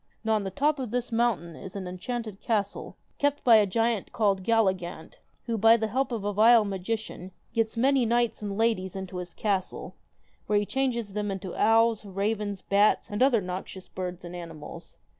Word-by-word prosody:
Now 220 Hz, 0 st, +1 dB
on 215 Hz, -2 st, +1 dB
the 195 Hz, -, -3 dB
top 290 Hz, +9 st, +1 dB
of 255 Hz, -4 st, -3 dB
this 245 Hz, +2 st, -2 dB
mountain 225 Hz, -8 st, 0 dB
is 190 Hz, +2 st, -10 dB
an 190 Hz, -2 st, -5 dB
enchanted 215 Hz, +3 st, -5 dB
castle, 205 Hz, -3 st, -2 dB, 0.2 s
kept 285 Hz, 0 st, +1 dB
by 235 Hz, -3 st, +7 dB
a 210 Hz, -1 st, +4 dB
giant 225 Hz, +1 st, 0 dB
called 200 Hz, -4 st, +1 dB
Galligant, 190 Hz, -7 st, 0 dB, 0.3 s
who, 230 Hz, -2 st, -2 dB
by 225 Hz, +2 st, +7 dB
the 220 Hz, -1 st, -2 dB
help 260 Hz, +3 st, 0 dB
of 225 Hz, -4 st, -3 dB
a 205 Hz, 0 st, -1 dB
vile 225 Hz, +2 st, +6 dB
magician, 195 Hz, -1 st, -4 dB, 0.2 s
gets 225 Hz, 0 st, 0 dB
many 265 Hz, +2 st, +3 dB
knights 235 Hz, -1 st, +1 dB
and 200 Hz, -1 st, -4 dB
ladies 220 Hz, -5 st, 0 dB
into 190 Hz, -1 st, -6 dB
his 180 Hz, -1 st, -7 dB
castle, 195 Hz, -3 st, -2 dB, 0.5 s
where 210 Hz, -, +2 dB
he 205 Hz, -, +1 dB
changes 235 Hz, -5 st, -1 dB
them 210 Hz, 0 st, -2 dB
into 190 Hz, -2 st, -5 dB
owls, 225 Hz, 0 st, +3 dB
ravens, 205 Hz, 0 st, -2 dB
bats, 205 Hz, +2 st, +2 dB
and 205 Hz, -, -3 dB
other 255 Hz, -5 st, +4 dB
noxious 185 Hz, +1 st, -6 dB
birds 180 Hz, -1 st, -6 dB
and 175 Hz, +1 st, -7 dB
animals. 165 Hz, -3 st, -9 dB
210 Hz, 185 wpm, -27 LUFS, 190-230 Hz, 0.5 s, by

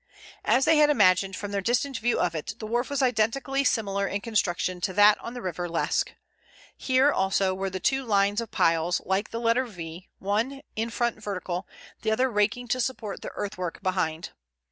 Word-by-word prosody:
As 265 Hz, -, +3 dB
they 320 Hz, -1 st, +5 dB
had 300 Hz, 0 st, +6 dB
imagined 195 Hz, -6 st, +4 dB
from 205 Hz, -1 st, -5 dB
their 200 Hz, -1 st, -1 dB
distant 245 Hz, +4 st, 0 dB
view 240 Hz, +2 st, +1 dB
of 175 Hz, -2 st, +1 dB
it, 165 Hz, +6 st, -5 dB
the 220 Hz, -, -7 dB
wharf 240 Hz, +3 st, -1 dB
was 285 Hz, -1 st, 0 dB
identically 260 Hz, +3 st, +1 dB
similar 200 Hz, -6 st, 0 dB
in 200 Hz, -, -2 dB
construction 185 Hz, -5 st, -1 dB
to 185 Hz, -, -1 dB
that 205 Hz, +2 st, +6 dB
on 235 Hz, -, -7 dB
the 245 Hz, -, -6 dB
River 175 Hz, -1 st, -3 dB
Lesque. 165 Hz, -, 0 dB, 0.6 s
Here 265 Hz, +2 st, +3 dB
also 190 Hz, 0 st, +1 dB
were 190 Hz, +1 st, -2 dB
the 185 Hz, 0 st, -5 dB
two 270 Hz, +7 st, +1 dB
lines 205 Hz, -1 st, +2 dB
of 230 Hz, -, -6 dB
piles 165 Hz, +2 st, +2 dB
like 190 Hz, +3 st, 0 dB
the 230 Hz, -, -4 dB
letter 235 Hz, +2 st, +2 dB
V, 175 Hz, -3 st, -9 dB
one, 225 Hz, +8 st, -1 dB
in 225 Hz, +1 st, -1 dB
front 235 Hz, -1 st, -1 dB
vertical, 185 Hz, -2 st, -4 dB, 0.3 s
the 220 Hz, -, -1 dB
other 255 Hz, +4 st, +2 dB
raking 220 Hz, +4 st, 0 dB
to 255 Hz, +2 st, +1 dB
support 230 Hz, -5 st, -3 dB
the -, -, -5 dB
earthwork 185 Hz, -4 st, -4 dB
behind. 175 Hz, -3 st, -1 dB
210 Hz, 190 wpm, -26 LUFS, 185-240 Hz, 0.6 s, had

